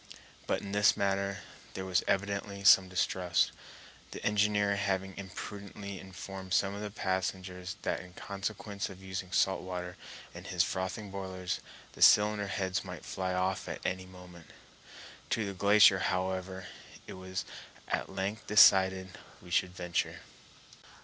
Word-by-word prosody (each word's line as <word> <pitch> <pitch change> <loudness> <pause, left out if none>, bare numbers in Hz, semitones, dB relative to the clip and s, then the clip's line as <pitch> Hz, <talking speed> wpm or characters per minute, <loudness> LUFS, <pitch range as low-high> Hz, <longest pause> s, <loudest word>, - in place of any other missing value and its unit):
But - - 0
in 100 - -7
this 105 0 +4
matter 100 -1 0 0.3
there 95 - -4
was 90 -2 +2
evidently 100 0 -1
some 95 -1 +7
distrust, 90 -1 +1 0.6
the - - -8
engineer 105 -1 +2
having 95 -1 -1
imprudently 100 0 -7
informed 95 0 -5
some 100 0 +2
of 100 - -6
the 105 - -4
passengers 95 -2 -3
that - - 0
in 90 0 -12
consequence 100 0 -4
of 95 0 -12
using 95 -1 -5
salt 95 0 +2
water 90 -1 -5 0.4
in - - -10
his - - +2
frothing 95 +2 -3
boilers 95 -2 -4 0.3
the - - -14
cylinder 105 0 +6
heads 95 -1 -1
might - - -8
fly 95 -1 -2
off 95 +1 -1
at - - -6
any 95 0 -2
moment. 90 -2 -13 0.8
To 110 - 0
the 100 - -4
glacier, 100 0 +6
however, 95 0 -2 0.4
it - - -8
was 95 0 -5 0.4
at - - -2
length 95 +3 -3
decided 95 -2 +5 0.2
we 90 - -14
should 90 0 +1
venture. 90 -2 -2
95 Hz, 145 wpm, -31 LUFS, 95-100 Hz, 0.8 s, some